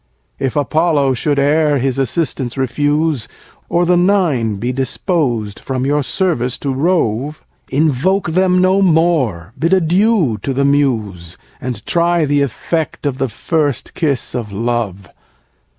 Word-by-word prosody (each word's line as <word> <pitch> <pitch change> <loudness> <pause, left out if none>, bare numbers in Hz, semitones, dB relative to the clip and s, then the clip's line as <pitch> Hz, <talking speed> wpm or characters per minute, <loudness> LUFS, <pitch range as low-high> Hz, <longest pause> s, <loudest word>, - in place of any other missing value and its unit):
3. 135 - 0
If 130 - -5
Apollo 145 -1 +2
should 145 +4 -1
e'er 145 +1 +3
his 135 0 -1
assistance 135 -1 -1
refuse, 145 +1 0 0.4
Or 175 +1 +2
the 180 +1 +3
Nine 175 - +2
be 120 +6 -3
dispos'd 130 - -1
from 130 -1 -3
your 145 +2 +1
service 135 -6 -1
to 140 -2 -3
rove, 145 -3 0 0.3
Invoke 160 +6 +1
them 185 +1 +3
no 185 +2 +3
more, 155 - +1
bid 165 +4 +2
adieu 180 - +2
to 135 - -2
the 140 +2 +1
Muse, 110 - 0 0.2
And 125 -5 -5
try 170 -1 +2
the 145 0 +1
effect, 155 +4 -2
of 135 -2 -2
the 135 -1 0
first 145 0 -2
kiss 145 -7 -1
of 120 -5 -4
love. 105 -3 -2
140 Hz, 140 wpm, -16 LUFS, 125-165 Hz, 0.4 s, e'er